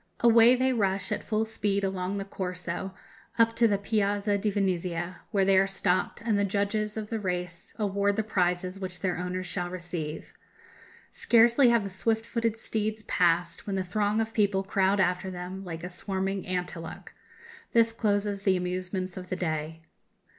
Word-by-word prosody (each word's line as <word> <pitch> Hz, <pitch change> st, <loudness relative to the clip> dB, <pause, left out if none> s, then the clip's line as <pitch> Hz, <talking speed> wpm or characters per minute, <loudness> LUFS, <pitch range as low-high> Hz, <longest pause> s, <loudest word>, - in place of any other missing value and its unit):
Away 235 Hz, +1 st, +7 dB
they 260 Hz, +1 st, +2 dB
rush 195 Hz, -4 st, 0 dB
at -, -, -1 dB
full 220 Hz, 0 st, 0 dB
speed 205 Hz, -2 st, -1 dB
along 190 Hz, 0 st, -2 dB
the 195 Hz, -, -3 dB
Corso 185 Hz, 0 st, -4 dB, 0.4 s
up 230 Hz, 0 st, +4 dB
to 230 Hz, 0 st, +5 dB
the 205 Hz, -2 st, +2 dB
Piazza 205 Hz, 0 st, 0 dB
di 200 Hz, +1 st, 0 dB
Venezia, 180 Hz, -3 st, -2 dB
where 195 Hz, -3 st, +2 dB
they 195 Hz, 0 st, +4 dB
are 195 Hz, -, +3 dB
stopped, 195 Hz, +2 st, 0 dB
and 215 Hz, -3 st, +2 dB
the -, -, +2 dB
judges 205 Hz, +2 st, -1 dB
of 215 Hz, 0 st, -5 dB
the 225 Hz, -, -1 dB
race 180 Hz, -3 st, -4 dB
award 200 Hz, -1 st, +1 dB
the 220 Hz, -, 0 dB
prizes 180 Hz, -2 st, 0 dB
which 185 Hz, -2 st, -6 dB
their 185 Hz, -2 st, -1 dB
owners 180 Hz, +1 st, -3 dB
shall 175 Hz, 0 st, -3 dB
receive. 170 Hz, -4 st, -5 dB, 0.8 s
Scarcely 235 Hz, +3 st, +5 dB
have 235 Hz, -2 st, +3 dB
the 200 Hz, -, -4 dB
swift 225 Hz, +4 st, 0 dB
footed 230 Hz, -2 st, -1 dB
steeds 215 Hz, -1 st, -2 dB
passed, 175 Hz, 0 st, +1 dB
when 200 Hz, -, -1 dB
the 190 Hz, -, 0 dB
throng 205 Hz, +3 st, 0 dB
of 225 Hz, 0 st, -2 dB
people 200 Hz, -3 st, +2 dB
crowd 195 Hz, 0 st, +2 dB
after 180 Hz, +1 st, +1 dB
them 185 Hz, +1 st, -6 dB
like 170 Hz, -2 st, -6 dB
a -, -, -3 dB
swarming 190 Hz, +1 st, -3 dB
ant 180 Hz, -1 st, -2 dB
hillock. 165 Hz, -1 st, -9 dB, 0.6 s
This 230 Hz, -1 st, +4 dB
closes 205 Hz, -2 st, 0 dB
the 190 Hz, -2 st, +3 dB
amusements 185 Hz, +1 st, -3 dB
of 180 Hz, -1 st, -8 dB
the -, -, -1 dB
day.... 160 Hz, -2 st, -3 dB
195 Hz, 175 wpm, -28 LUFS, 180-215 Hz, 0.8 s, Away